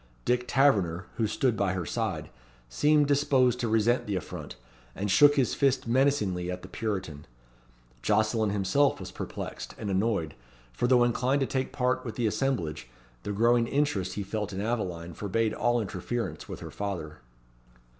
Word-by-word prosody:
Dick 125 0 +1
Taverner, 100 -11 +2
who 110 - +1
stood 120 +3 +1
by 100 -3 0
her 90 -2 -3
side, - - -3 0.4
seemed 150 - +3
disposed 135 -3 +3
to 120 - -1
resent 115 +2 +2
the 100 - -1
affront, 90 - -6 0.4
and 100 0 -2
shook 145 +8 +7
his 130 -5 +2
fist 135 -3 +1
menacingly 115 -9 +1
at 90 0 -5
the - - -8
Puritan. 95 -8 -4 0.7
Jocelyn 110 - +2
himself 100 +8 +2
was - - -7
perplexed - - -6
and 100 - -4
annoyed, 95 -6 0 0.4
for 120 - 0
though 125 -1 +5
inclined 125 +3 +1
to - - +3
take 130 0 -2
part 130 0 0
with 115 -4 -6
the 120 - -1
assemblage, 85 - -1 0.3
the 105 - -4
growing 115 +3 +3
interest 135 -10 0
he 105 - -2
felt 105 +1 -3
in 95 - -5
Aveline 90 -6 -3
forbade 110 +4 -1
all 120 0 +1
interference 95 -3 -4
with - - -7
her - - -7
father. 85 -8 -5
110 Hz, 165 wpm, -28 LUFS, 95-125 Hz, 0.7 s, shook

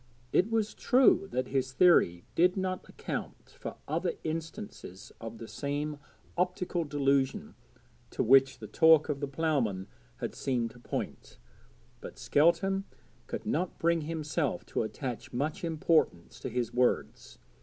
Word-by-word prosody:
It 190 - +3
was 220 -2 0
true 250 -6 +4
that 130 0 -2
his 130 -1 -1
theory 125 - +4
did 180 +3 +3
not 185 -1 -3
account - - -6
for - - -7
other - - -1
instances 160 - -6
of 115 0 -7
the 115 - -8
same 145 +2 -3 0.4
optical 180 -1 -1
delusion 140 -2 0 0.6
to - - -1
which 135 +2 +5
the 110 - -9
talk 160 - +5
of 145 -2 -1
the 145 - -2
ploughman 135 -10 0 0.3
had - - -5
seemed 120 -4 -1
to 125 - -16
point, - - -5 0.6
but - - -10
Skelton 170 +6 +2 0.4
could - - -5
not 180 - -1
bring 170 0 +2
himself 155 -2 -2
to - - -2
attach 120 +2 -5
much 145 +7 -2
importance 160 - +1
to - - -4
his 120 -1 -2
words. 125 0 0
150 Hz, 140 wpm, -30 LUFS, 125-170 Hz, 0.6 s, which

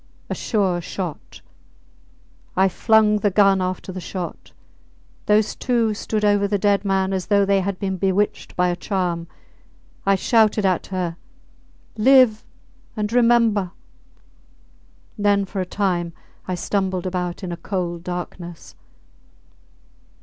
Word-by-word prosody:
A - - +1
sure 190 -5 0
shot! 175 -2 -6 1.2
I 190 +1 +5
flung 215 +1 +3
the 205 - +2
gun 195 -1 +4
after 185 +1 -3
the 185 0 -6
shot. 180 -1 -6 0.8
Those 210 0 +3
two 235 -4 +1
stood 210 0 -2
over 205 -1 +3
the 205 0 0
dead 200 0 +2
man 195 -1 0
as 185 -1 -2
though 200 -1 +3
they 195 0 +2
had 195 0 -2
been 190 -1 -2
bewitched 195 +2 -1
by 180 0 +2
a 175 - 0
charm. 175 -2 -2 0.8
I 195 0 +3
shouted 215 0 +3
at 185 -2 +1
her, 180 -3 -3 0.8
Live 245 -1 +5 0.5
and 210 +1 -2
remember! 230 -6 +3 1.5
Then 205 -1 +2
for 195 0 -4
a 185 - -4
time 180 -4 -1 0.3
I 185 - -1
stumbled 190 0 -1
about 180 0 -3
in 180 - -4
a 170 - -4
cold 175 -1 -4
darkness. 175 -1 -7
195 Hz, 130 wpm, -22 LUFS, 180-210 Hz, 1.5 s, I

